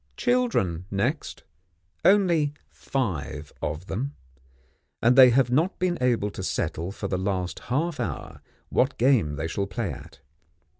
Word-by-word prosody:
Children, 230 - +1
next. 120 +10 -2 0.6
Only 170 -7 +4 0.2
five 75 - -3
of 75 +4 -3
them, 135 +10 -4 0.8
and 120 +2 +4
they 130 -1 +9
have 125 0 +3
not 160 +9 +2
been 180 -1 0
able 115 -5 +1
to 95 - -7
settle 90 -1 -2
for 100 0 -5
the 95 -1 -1
last 95 -2 -2
half 155 +6 0
hour - - -5 0.3
what 130 +2 +1
game 115 - +3
they 75 +3 -3
shall 100 +4 -2
play 100 0 -3
at. 70 - -11
120 Hz, 140 wpm, -26 LUFS, 90-145 Hz, 0.8 s, they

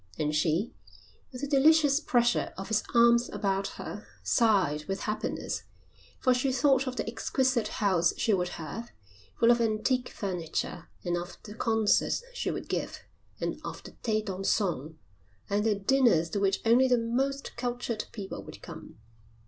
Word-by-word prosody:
And 150 0 0
she, 160 +7 +1 0.6
with 250 -1 -8
the 285 - -2
delicious 290 0 +5
pressure 240 -5 +1
of 195 +3 -6
his 215 -1 +2
arms 235 +1 +5
about 195 -1 -1
her, - - -7 0.2
sighed 190 - +2
with 195 +3 -3
happiness, 215 0 -3 0.6
for 255 - +3
she 255 +2 +1
thought 265 +1 +3
of 255 - -3
the 225 - -3
exquisite 245 0 0
house 190 -5 +2
she 220 - +2
would 180 -2 +1
have, 170 +9 -6 0.5
full 230 0 +6
of 240 0 +3
antique 230 +3 +1
furniture, 175 -3 -4 0.2
and 175 0 0
of 175 +1 -6
the 210 - -9
concerts 225 - +2
she - - -2
would - - -4
give, - - -3 0.4
and - - -3
of - - -7
the - - -10
thés 215 -2 -2
dansants, 185 - -1 0.6
and 205 +1 +2
the 215 -1 +2
dinners 200 -6 +3
to 205 - -1
which 195 -1 +1
only 240 +3 +5
the 250 -1 +4
most 265 +4 -1
cultured 240 -2 -3
people 200 -3 -6
would - - -12
come. - - -10
225 Hz, 160 wpm, -29 LUFS, 195-250 Hz, 0.6 s, full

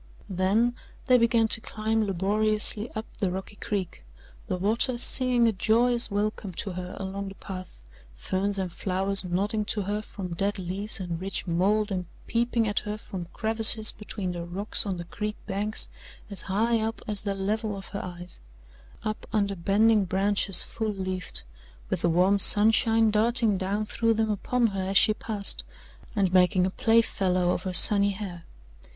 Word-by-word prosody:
Then 200 +6 +1 0.3
they 255 -2 +4
began 230 -1 +2
to 225 - +1
climb 220 0 -2
laboriously 210 +3 0
up 220 +1 -4
the 195 - 0
rocky 190 +3 -7
creek 190 - -5 0.4
the 185 - -2
water 225 +6 0
singing 245 -1 +5
a - - +3
joyous 235 +4 +1
welcome 205 -1 -3
to 195 - -3
her 180 0 -7
along 195 +1 -5
the 195 - -12
path, 185 - -10 0.3
ferns 190 - -1
and 185 -3 -4
flowers 195 +1 0
nodding 200 +5 -2
to 205 0 -2
her 205 +2 -3
from 195 -3 -8
dead 200 +4 -2
leaves 190 +4 -2
and 175 -2 -5
rich 195 +1 -3
mould 200 +5 0
and 180 -2 -3 0.2
peeping 235 -1 0
at 205 - 0
her 210 0 -6
from 185 -4 -8
crevices 220 0 +6
between 205 -3 -6
the 175 -1 -6
rocks 195 +5 -4
on 190 -2 -3
the 175 - -6
creek 210 +5 -5
banks 210 +2 -2 0.4
as 200 - +2
high 225 +4 +1
up 220 +1 -4
as 210 -2 -3
the 200 -2 -3
level 210 +2 -3
of 195 - -10
her 200 - -6
eyes 180 -1 -10 0.6
up 215 -1 -5
under 200 -2 0
bending 205 +4 +2
branches 195 +1 0
full 220 -2 -4
leafed, 185 - -4 0.5
with - - -1
the 170 - +1
warm 185 +4 +2
sunshine 225 +2 +5
darting 225 0 +2
down 200 +3 -2
through 230 +1 0
them 220 0 0
upon 240 +4 -1
her 195 -3 -1
as 190 +1 0
she 215 - +5
passed, 210 -2 -2 0.5
and 190 -3 0
making 185 0 +3
a 190 - -2
playfellow 190 -5 +1
of - - -2
her 185 - -3
sunny 200 +2 +8
hair. 185 -4 -8
200 Hz, 170 wpm, -26 LUFS, 185-220 Hz, 0.6 s, sunny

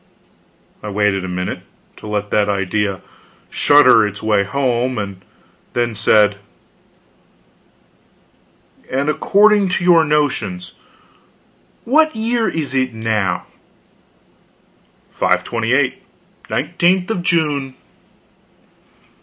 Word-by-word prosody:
I 105 - -6
waited 100 -2 0
a - - -5
minute, 90 0 -4 0.4
to - - -11
let 105 -1 -3
that 105 -1 +1
idea 100 0 -2 0.5
shudder 135 -6 +5
its 105 +2 -8
way 105 -2 +2
home, 125 +1 -1
and 100 -3 -5 0.5
then 120 -1 -1
said: 105 -1 +3 2.5
"And 140 +3 -1
according 205 +4 +3
to 180 0 -1
your 175 -2 +5
notions, 120 - -1 1.1
what 310 +3 +2
year 225 +1 0
is 150 -4 -3
it 130 -3 -1
now?" 110 -5 -1 1.7
"528 125 +3 0 0.5
nineteenth 180 +3 0
of 185 - -2
June." 150 -6 0
120 Hz, 90 wpm, -17 LUFS, 105-160 Hz, 2.5 s, shudder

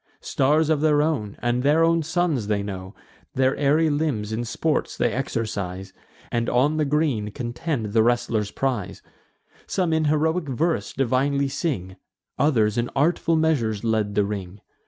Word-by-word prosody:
Stars 150 +3 +2
of 150 -2 +1
their 150 -1 +3
own, 130 -11 -2
and 120 +1 +1
their 150 +4 +3
own 165 0 +3
suns, 160 - 0
they 105 -1 0
know; 95 -1 -7 0.4
Their 130 0 +2
airy 150 +3 +3
limbs 145 -9 -1
in 120 +2 -2
sports 155 +6 -1
they 120 - +1
exercise, 100 -6 -3 0.4
And 115 0 0
on 140 +5 +2
the 155 - +1
green 140 -8 0
contend 120 0 -4
the 115 - +5
wrestler's 115 -2 +1
prize. 125 -7 -3 0.6
Some 180 -4 0
in 160 0 +1
heroic 160 +3 +1
verse 145 -4 -1
divinely 135 +2 +1
sing; 95 - -3 0.4
Others 115 -7 +2
in 120 - -1
artful 165 +3 +2
measures 130 -10 +1
led 110 -3 0
the 105 0 +3
ring. 100 -1 -6
130 Hz, 155 wpm, -24 LUFS, 105-155 Hz, 0.6 s, the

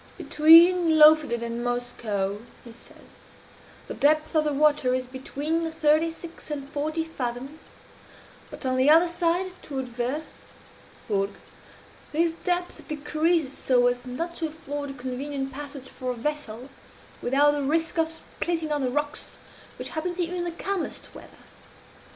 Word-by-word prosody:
"Between 330 +1 +6
Lofoden 300 -6 +6
and 235 0 -4
Moskoe," 220 -5 -2 0.2
he 235 - -11
says, 235 - -15 0.8
"the - - -6
depth 305 +2 +2
of 310 -1 +3
the 300 - +1
water 290 -3 +3
is 255 0 -2
between 295 +6 -3
thirty 320 0 +3
six 330 0 -10
and 285 -2 -4
forty 310 +3 -2
fathoms; 270 0 -5 0.9
but - - -9
on 255 0 +1
the 260 +3 +4
other 330 +3 +7
side, 345 +2 0
toward 265 -3 -5
Ver 250 +6 -2 0.8
(Vurrgh), 200 -2 -1 0.8
this 330 +2 +2
depth 355 +2 -3
decreases 305 0 0
so 245 -2 +2
as 245 0 +1
not 330 +8 -5
to 325 - -1
afford 290 -2 -6
a - - -6
convenient 270 +1 -4
passage 280 -1 -7
for 255 - -6
a 250 - -1
vessel, 255 -2 -4 0.5
without 280 +4 +4
the 290 0 -2
risk 325 +4 0
of 320 0 +2
splitting 325 0 -4
on 295 -1 0
the 255 - 0
rocks, 295 +3 -3 0.4
which - - -5
happens 350 +3 -4
even 355 +1 -1
in 350 - -2
the 345 - -2
calmest 385 +2 -4
weather. - - -11
295 Hz, 150 wpm, -26 LUFS, 255-325 Hz, 0.9 s, other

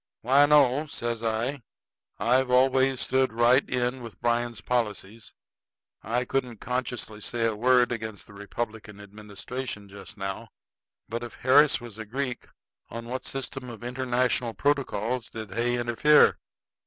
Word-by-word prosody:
"Why, 140 +4 +5
no," 145 0 +4
says 120 -5 -3
I. 115 +5 -1 0.6
"I've 125 +2 +2
always 130 +1 +3
stood 130 -1 +2
right 120 +4 +4
in 125 0 -1
with 115 -3 -10
Bryan's 120 -1 0
policies, 110 -2 -3 0.7
and 110 - -9
I 125 +1 +1
couldn't 125 -3 -2
consciously 125 -2 -4
say 115 +2 -1
a 110 -1 0
word 125 +2 +3
against 110 -3 -5
the - - -16
Republican 105 0 -6
administration 105 +2 -7
just 100 +2 -10
now. 95 -1 -5 0.6
But 115 +1 -4
if 120 -1 -8
Harris 140 +3 +5
was 120 -3 -10
a 110 - -5
Greek, 125 +2 -4 0.4
on 115 0 -7
what 130 +1 -4
system 135 -1 -4
of 120 -1 -10
international 125 -1 0
protocols 130 -5 -1
did 110 -3 -7
Hay 120 +4 +1
interfere?" 120 +6 +4
120 Hz, 140 wpm, -27 LUFS, 110-130 Hz, 0.7 s, Why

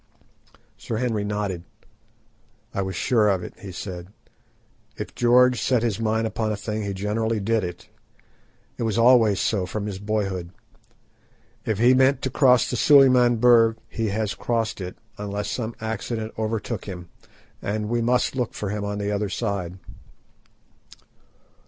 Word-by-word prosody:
Sir 115 - -4
Henry 115 -3 -1
nodded. 105 -4 -3 1.1
"I 100 - -1
was 95 -1 -3
sure 110 0 +2
of 95 -3 0
it," - - -8
he 100 - -8
said. 90 -1 -7 0.9
"If - - -6
George 125 -1 +4
set 120 +3 +2
his 115 -3 -1
mind 110 0 0
upon 110 0 -2
a 105 - -2
thing 110 +1 -4
he 100 -1 -3
generally 110 +3 -1
did 110 +1 0
it. 90 -1 -6 0.9
It - - -6
was 115 -1 0
always 115 -4 +5
so 95 -5 0
from 105 +2 -4
his 100 -2 -5
boyhood. 100 -4 -2 1.2
If 110 -3 0
he 120 +4 +5
meant 130 +2 +3
to 130 - -1
cross 125 -3 +4
the - - -2
Suliman 130 -4 +6
Berg 115 -1 +5
he 115 -1 -3
has 105 0 -1
crossed 115 -2 -2
it, 90 0 -6 0.2
unless 105 0 -3
some 115 -2 -3
accident 110 0 -4
overtook 110 -1 -3
him, 90 -3 -8 0.5
and 105 +1 -2
we 120 +1 0
must 125 +3 +1
look 125 -3 -2
for 100 -2 -3
him 105 -1 -3
on 100 0 -3
the 100 0 -2
other 105 0 -1
side." 95 -4 -3
110 Hz, 155 wpm, -24 LUFS, 100-115 Hz, 1.2 s, Suliman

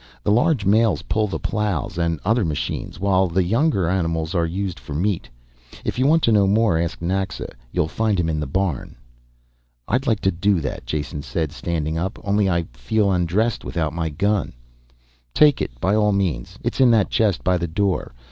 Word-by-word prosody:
The - - +1
large 120 +1 +2
males 100 -5 +3
pull 110 +4 0
the 100 - -3
ploughs 105 - -2
and 85 -2 0
other 115 +3 +2
machines, 80 0 -3
while 95 -1 +2
the 90 +2 +1
younger 115 - +1
animals 80 -2 -1
are 85 -2 +1
used 95 -2 -3
for 70 +3 -8
meat. 95 +3 -1 0.6
If - - -2
you 130 - +3
want 165 +2 +4
to 115 - +4
know 100 -2 +4
more, 105 -4 +3
ask 85 0 -3
Naxa, 95 0 -2 0.2
you'll 90 -3 0
find 105 +3 0
him 85 - +1
in 80 -2 -1
the 75 - -3
barn." 90 -1 -2 0.9
"I'd 130 +3 0
like 110 -4 +2
to 95 - +2
do 95 +2 +1
that," 70 - -5
Jason 75 -1 -3
said, 80 0 -3
standing 80 0 -2
up. 95 +5 -3
"Only 100 -1 +2
I 85 -1 +1
feel 100 - 0
undressed 95 +6 0
without 80 -3 -2
my 85 -1 -2
gun 100 +4 0 0.4
" - - -38
"Take 150 -2 +5
it, - - -4
by 95 +8 +1
all 105 -1 +3
means, 90 -11 -2
it's - - -1
in 130 - +7
that 110 -4 +3
chest 105 -6 +1
by 90 0 +2
the 85 - -2
door. 95 +3 -1
95 Hz, 195 wpm, -22 LUFS, 80-105 Hz, 0.9 s, in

